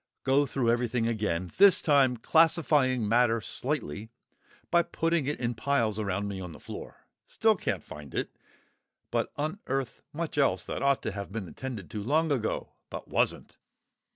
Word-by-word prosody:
Go 140 +2 +3
through 125 -4 +1
everything 120 -1 0
again, 105 -6 -1
this 200 -1 +8
time 135 -5 +3
classifying 145 -4 +3
matter 115 +1 +3
slightly 100 0 -3 0.6
by 170 - +5
putting 165 -3 0
it 145 - -2
in 120 -1 -1
piles 115 -4 0
around 100 -1 -1
me 100 -2 -5
on 90 -3 -7
the - - -12
floor; - - -9 0.2
still 220 -1 +3
can't - - -2
find 75 -2 -10
it, - - -3 0.8
but - - 0
unearth 145 - -3
much 160 -1 -3
else 140 - +2
that - - -4
ought 140 -1 +2
to - - -2
have 100 0 -6
been 105 -3 -4
attended 120 -3 -7
to 105 - -4
long 155 +8 +1
ago 120 -6 -1 0.2
but - - -7
wasn't. - - -1
125 Hz, 160 wpm, -29 LUFS, 105-145 Hz, 0.8 s, this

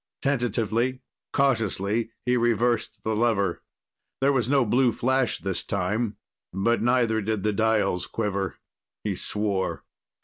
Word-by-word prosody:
Tentatively, 120 -1 0 0.3
cautiously, 115 -4 +1 0.2
he 125 0 +2
reversed 120 -1 +1
the 110 0 0
lever. 110 -3 +1 0.6
There 140 +1 +3
was 125 -3 +1
no 135 -3 +4
blue 125 +3 +3
flash 130 +1 +1
this 95 -2 -3
time, 100 +4 -1 0.3
but 115 +5 +1
neither 120 -2 +2
did 105 -1 -2
the 105 - +1
dials 105 -4 +1
quiver. 100 -4 -2 0.5
He - - -1
swore. 100 -2 -1
110 Hz, 125 wpm, -26 LUFS, 100-120 Hz, 0.6 s, no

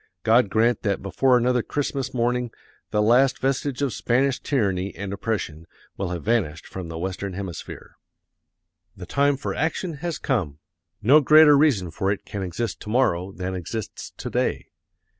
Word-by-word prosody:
God 115 -1 +4
grant 115 +3 +2
that 100 -3 -1
before 125 +6 +3
another 125 0 +2
Christmas 135 0 -3
morning 125 0 0 0.4
the 105 - +1
last 125 +5 +4
vestige 135 0 -1
of 135 - 0
Spanish 130 +3 +1
tyranny 100 - -1
and 100 +2 -5
oppression 95 -7 -3 0.3
will 95 -2 -3
have 85 -3 -4
vanished 95 -9 0
from 95 -3 -7
the 80 0 -6
Western 95 +2 -4
Hemisphere!... 95 -3 -8 1.0
The 90 - -8
time 140 +7 +2
for - - -4
action 165 0 -2
has 170 -2 -2
come. 90 - -1 0.5
No 140 +8 +6
greater 155 +1 +7
reason 130 - +2
for 95 +4 -1
it 100 - -4
can 100 - -5
exist 95 +4 -3
to - - -8
morrow 95 -7 +1
than 95 -1 -4
exists 95 +4 -6
to - - -6
day. - - -1
115 Hz, 160 wpm, -24 LUFS, 95-135 Hz, 1.0 s, greater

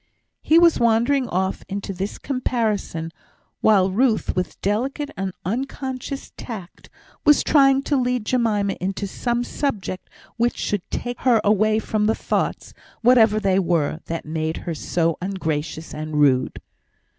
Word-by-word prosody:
He 320 - +4
was 340 -1 +5
wandering 235 +3 +2
off 190 +1 -1
into 195 0 -4
this 190 +3 -4
comparison, 220 - -2 0.5
while 195 -3 +4
Ruth, 225 +2 +1
with 180 0 -3
delicate 265 +8 -1
and 195 -1 -3
unconscious 265 +4 -4
tact, 195 -7 -9 0.3
was 295 -2 +5
trying 275 -2 +4
to 285 - +1
lead 250 -3 0
Jemima 215 -5 +1
into 195 +2 -2
some 240 +4 -1
subject 220 -9 -3 0.3
which 240 +1 +1
should 205 -2 -1
take 245 0 -4
her 245 -4 +4
away 215 +1 +3
from 215 -1 0
the 220 - +2
thoughts, - - -2 0.3
whatever 225 -3 +5
they 195 -2 +2
were, 165 -4 0
that 165 0 -4
made 160 +1 -2
her 170 - -2
so 165 +1 -1
ungracious 160 -4 -3
and 155 0 -5
rude. 135 -3 +2
210 Hz, 140 wpm, -22 LUFS, 185-250 Hz, 0.5 s, was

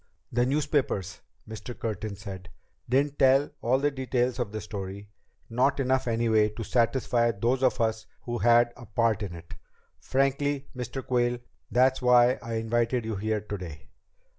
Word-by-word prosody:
"The 120 +1 +2
newspapers," 135 - -1 0.3
Mr. 110 +2 -8
Curtin 110 -2 -4
said, 95 -2 -9 0.4
"didn't 140 +3 +1
tell 135 +2 +4
all 125 +3 +2
the 145 +2 +1
details 130 -2 -1
of 120 -4 -2
the 110 - -4
story, 100 -1 -7 0.4
not 130 +4 +1
enough 130 -1 +1
anyway 115 -2 +2
to 110 +2 -7
satisfy 120 0 +2
those 115 +4 0
of 130 -2 +2
us 110 -1 0 0.2
who 120 -1 -3
had 120 0 +4
a 120 -2 -12
part 110 0 +1
in 95 -4 -4
it. 85 0 -11 0.5
Frankly, 140 +1 0
Mr. 125 +1 -5
Quayle, 120 -1 +1 0.3
that's 130 +2 +3
why 125 0 +5
I 115 0 -4
invited 115 +1 0
you 110 -1 -2
here 110 +1 -1
today. 90 -8 -8
120 Hz, 155 wpm, -27 LUFS, 110-130 Hz, 0.5 s, why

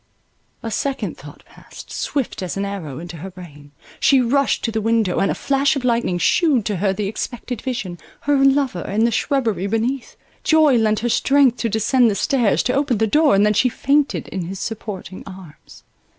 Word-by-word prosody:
A 225 - -4
second 275 +4 -2
thought - - -14
passed, - - -14
swift 275 -8 -3
as 185 +1 -4
an 200 - -1
arrow, 175 -9 -6
into 170 +1 -8
her 185 +5 -7
brain; 155 -6 -13 0.3
she 275 - +4
rushed 265 +3 +1
to 230 - -1
the 220 0 -2
window; 225 -4 +1
and 195 - +2
a - - -1
flash 275 0 +1
of 265 -2 -3
lightning 235 -7 +1
shewed 270 - +2
to 205 -3 -1
her 195 +2 +1
the 200 +2 -3
expected 235 +3 -5
vision, 200 -10 -4 0.2
her 285 -1 +2
lover 270 -9 +2
in 215 +6 0
the 235 - +2
shrubbery 225 -5 0
beneath; 230 +5 -2 0.3
joy 315 -3 +4
lent 215 -2 +2
her 240 - 0
strength 270 +1 +3
to 230 - -1
descend 230 +3 +3
the 205 - -1
stairs, 240 -1 +1
to 250 - 0
open 275 -4 +1
the 220 - +2
door, 295 +2 +3
and 200 +1 +4
then 210 - +3
she 240 +5 +3
fainted 280 +4 0
in 185 -3 -4
his 190 +2 -6
supporting 205 -4 -6
arms. 185 -5 -13
225 Hz, 195 wpm, -20 LUFS, 195-270 Hz, 0.3 s, she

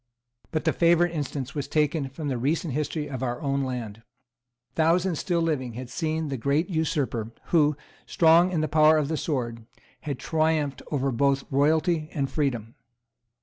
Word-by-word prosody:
But 155 - -2
the 160 - +3
favourite 170 0 +3
instance 140 -3 -4
was 145 -3 -3
taken 150 -2 0
from 150 +3 -6
the 130 -4 -1
recent 150 +3 -1
history 150 +1 -2
of 130 -3 -6
our 120 -2 -2
own 140 -1 -1
land. 115 -5 -5 0.7
Thousands 170 +1 +2
still 170 -2 0
living 130 -7 -1
had 125 +1 -7
seen 160 -2 -2
the 135 - -2
great 145 - 0
usurper, 145 -8 -1 0.2
who, 150 -3 +3 0.3
strong 170 +2 +5
in 165 -4 0
the 155 - 0
power 155 0 +5
of 150 -2 0
the 160 - 0
sword, 120 -8 -3 0.3
had 145 -4 -4
triumphed 155 -2 0
over 135 -2 0
both 135 +3 +1
royalty 155 +3 +2
and 135 -4 -2
freedom. 120 -7 -1
150 Hz, 165 wpm, -26 LUFS, 135-160 Hz, 0.7 s, strong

